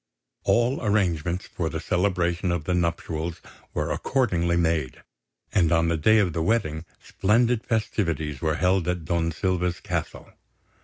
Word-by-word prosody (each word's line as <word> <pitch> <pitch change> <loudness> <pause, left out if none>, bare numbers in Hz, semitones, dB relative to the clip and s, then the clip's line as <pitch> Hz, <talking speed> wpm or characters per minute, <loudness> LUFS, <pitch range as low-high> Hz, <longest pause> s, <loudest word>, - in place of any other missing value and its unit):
All 120 +4 +2
arrangements 90 -4 0
for 80 -2 -3
the - - -4
celebration 90 -1 0
of 85 -3 -1
the 90 - -1
nuptials 85 -1 -2 0.4
were - - -1
accordingly 90 -10 +1
made; 80 -6 0 0.5
and 85 -5 +3
on 85 0 +3
the 85 - +1
day 110 +8 +4
of 95 -6 +2
the 80 - -1
wedding 80 -5 0
splendid 115 +4 +1
festivities 85 - -1
were 80 -2 +1
held 90 -1 +1
at 90 -2 -2
Don 85 0 0
Silva's 90 +1 -1
castle. - - -5
85 Hz, 145 wpm, -25 LUFS, 80-100 Hz, 0.5 s, day